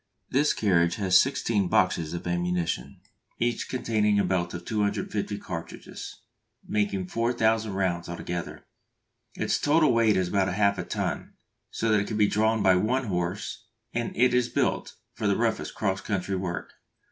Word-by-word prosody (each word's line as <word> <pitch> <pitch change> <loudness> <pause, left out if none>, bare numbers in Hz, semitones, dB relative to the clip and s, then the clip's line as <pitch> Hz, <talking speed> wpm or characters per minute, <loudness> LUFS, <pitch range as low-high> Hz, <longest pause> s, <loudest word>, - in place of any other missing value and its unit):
This 145 +3 +3
carriage 85 -5 +2
has 95 -3 +1
sixteen 110 -5 +3
boxes 85 -2 +1
of 85 - -6
ammunition, 85 -6 -2 0.4
each 120 -1 -1
containing 110 -5 +1
a 100 - +3
belt 90 -2 0
of 90 0 -7
250 105 -1 -1
cartridges, 85 -4 -8 0.4
making 100 -3 0
4000 110 +1 +1
rounds 90 -3 -1
altogether. 85 0 -5 0.7
Its - - 0
total 150 -2 +4
weight 115 -3 +4
is 90 -1 0
about 95 -1 +1
half 100 +1 +2
a - - -1
ton, - - -3 0.4
so 115 - -1
that 105 - +4
it 100 - -2
can 110 - -3
be 105 - +5
drawn 110 +1 +2
by 95 -1 +5
one 125 +7 +1
horse, 95 +6 -3 0.3
and 120 0 -1
it 125 +1 +4
is 125 -1 +2
built - - -1 0.2
for 110 - -2
the 100 - +2
roughest 115 -1 -1
cross 95 -2 -1
country 100 -1 -2
work. 90 -2 -4
100 Hz, 160 wpm, -27 LUFS, 90-110 Hz, 0.7 s, be